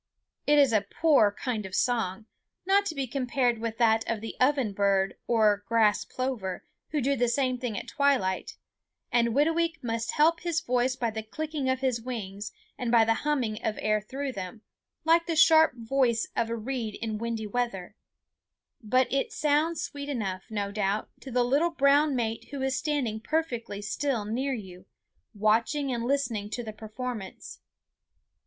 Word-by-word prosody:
It 295 0 +5
is 275 -5 +5
a 215 - +4
poor 215 +1 +3
kind 220 +1 -3
of 190 -1 -6
song, 225 -4 0 0.4
not 400 +1 +3
to 320 - -3
be 275 -1 -1
compared 250 -2 0
with 225 0 -3
that 225 -2 +3
of 230 -2 0
the 225 +1 -7
oven 255 -5 +2
bird 195 -1 +2
or 215 -3 +3
grass 220 -3 +3
plover, 235 -8 -4 0.2
who 300 - -1
do 275 +2 +1
the 245 -1 +1
same 255 +1 0
thing 240 -5 -3
at - - -6
twilight, 270 -11 0 0.5
and 235 -1 +3
Whitooweek 325 +5 +1
must 230 -1 -2
help 325 +3 +4
his 340 -2 -1
voice 250 -1 0
by 235 -3 -1
the 220 0 -4
clicking 295 +4 -3
of 260 0 0
his 255 -3 0
wings 210 -5 -5 0.3
and 245 -3 -1
by 230 -2 +6
the 225 - +3
humming 245 -5 -1
of 215 - -1
air 215 0 +1
through 270 +6 -4
them, 195 0 -7 0.4
like 335 +1 +4
the 335 - 0
sharp 315 -2 +6
voice 235 -1 +1
of 230 - 0
a 230 - -1
reed 230 -2 -4
in 220 -2 -3
windy 230 -1 -3
weather; 210 -4 -3 0.9
but 255 +4 +3
it 275 - 0
sounds 305 +2 +1
sweet 285 0 -6
enough, 195 -8 -3
no 205 -2 -2
doubt, 205 0 -1
to 270 - -10
the 250 0 +2
little 285 +8 +2
brown 285 -2 +3
mate 225 -2 -2
who 280 - -6
is 265 0 0
standing 260 -7 -1
perfectly 235 -7 -2
still 235 0 -1
near 255 +6 -1
you, 185 -4 -10 0.5
watching 225 +7 +1
and 235 -1 -2
listening 240 -6 -1
to 235 +3 -4
the 215 -1 -6
performance. 220 -1 -7
240 Hz, 175 wpm, -28 LUFS, 215-280 Hz, 0.9 s, by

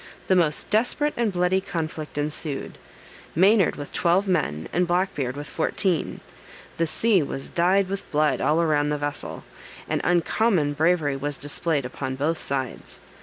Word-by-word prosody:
The 190 - +5
most 165 -1 +2
desperate 250 +7 +2
and 235 -3 0
bloody 180 +1 +1
conflict 160 -6 -5
ensued: 150 -1 -3 0.6
Maynard 195 +3 +4
with 145 - -8
twelve 180 +4 +2
men, 150 - 0
and 180 0 +2
Black 180 +3 +1
Beard 130 -1 -3
with 145 - -5
fourteen. 165 +3 -1 0.6
The 165 - +1
sea 210 +2 +3
was 135 -1 -5
dyed 185 +3 +2
with 195 +1 -6
blood 150 -2 +2
all 155 +2 +2
around 150 -3 +2
the 150 - 0
vessel, 145 0 -4 0.4
and - - -1
uncommon 175 -1 +2
bravery 155 -2 +1
was 145 0 -3
displayed 145 0 -1
upon 130 +1 -4
both 155 +4 -1
sides. 135 -2 -4
160 Hz, 155 wpm, -24 LUFS, 145-185 Hz, 0.6 s, The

